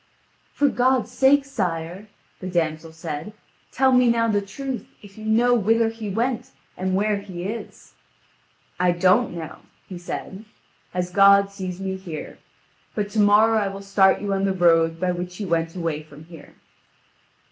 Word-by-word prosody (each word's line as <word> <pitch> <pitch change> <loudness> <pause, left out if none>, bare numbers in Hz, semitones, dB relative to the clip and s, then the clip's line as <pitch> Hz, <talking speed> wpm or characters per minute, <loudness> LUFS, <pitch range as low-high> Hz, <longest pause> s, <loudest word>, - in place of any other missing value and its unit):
"For 290 - +2
God's 255 -3 +1
sake, 270 +2 +4
sire," 185 -6 -4 0.3
the 185 - -6
damsel 160 -2 -2
said, 160 +4 -6 0.4
"tell 265 0 +3
me 250 -1 +5
now 230 0 +2
the 205 -2 +1
truth, 250 +6 -6 0.2
if 200 -1 -14
you 215 - -10
know 235 +3 +3
whither 225 0 +2
he 225 -2 -6
went, 240 +4 -2 0.3
and 185 0 -1
where 210 +1 +1
he 190 -3 -7
is." 220 +4 -7 0.9
"I 180 -1 +3
don't 185 +5 +2
know," 160 -2 -7 0.3
he 180 -2 -8
said, 190 +3 -6 0.5
"as 180 0 -3
God 200 +1 +5
sees 185 -2 -6
me 190 -1 -3
here; 175 -5 -8 0.6
but 205 -1 -2
to 220 - -1
morrow 215 +2 +5
I 205 - 0
will 195 0 -7
start 195 -1 +3
you 200 -1 -1
on 195 0 -1
the 195 - +1
road 165 -2 +3
by 180 0 0
which 180 0 -5
he 210 - -4
went 165 -1 -1
away 165 -4 -2
from 150 0 -14
here." 165 0 -14
195 Hz, 170 wpm, -23 LUFS, 175-225 Hz, 0.9 s, me